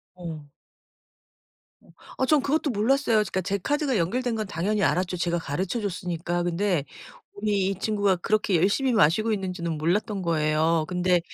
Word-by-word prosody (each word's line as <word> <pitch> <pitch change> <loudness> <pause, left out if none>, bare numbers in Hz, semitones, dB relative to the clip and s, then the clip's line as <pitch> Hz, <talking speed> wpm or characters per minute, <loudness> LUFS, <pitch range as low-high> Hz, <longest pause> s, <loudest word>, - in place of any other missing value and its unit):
어. 165 -4 -7 1.8
어 260 - +2
저는 300 +1 +4
그것도 300 +1 0
몰랐어요. 235 +1 +2
그니까 190 -3 0
제 200 +2 -1
카드가 285 - 0
연결된 230 +7 0
건 215 -1 -2
당연히 200 +3 -1
알았죠 180 0 +1
제가 170 0 0
가르쳐 180 +10 -2
줬으니까. 175 -2 -2
근데 175 -3 0 0.6
이 200 -2 +1
이 - - -3
친구가 205 -4 +1
그렇게 210 0 +1
열심히 235 - +2
마시고 215 +4 +3
있는지는 180 -5 -3
몰랐던 195 +5 0
거예요. 160 -1 +1
근데 180 0 +2
190 Hz, 345 characters per minute, -25 LUFS, 170-215 Hz, 1.8 s, 저는